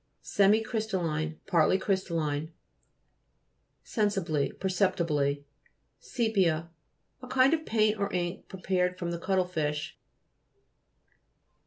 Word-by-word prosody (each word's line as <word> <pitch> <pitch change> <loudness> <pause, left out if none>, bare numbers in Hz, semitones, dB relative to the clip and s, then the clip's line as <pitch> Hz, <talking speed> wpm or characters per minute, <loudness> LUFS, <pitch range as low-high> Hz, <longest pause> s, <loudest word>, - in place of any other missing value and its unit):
SEMICRT'STALLINE 195 -7 +1
Partly 170 +1 +3
crystal 190 -3 -1
line. 150 0 -2 1.3
SENSIBLY 190 - 0
Perceptibly. 165 -7 0 0.6
SE'PIA 185 -9 0 0.5
A 255 - -9
kind 260 +3 +4
of 315 -1 -1
paint 215 -1 +2
or 200 - -1
ink 175 -1 -3
pre 190 - -10
pared 180 -1 0
from 175 -2 -3
the 170 - -3
cuttle 185 +1 +1
fish. 155 -4 -3
180 Hz, 100 wpm, -29 LUFS, 160-205 Hz, 1.3 s, kind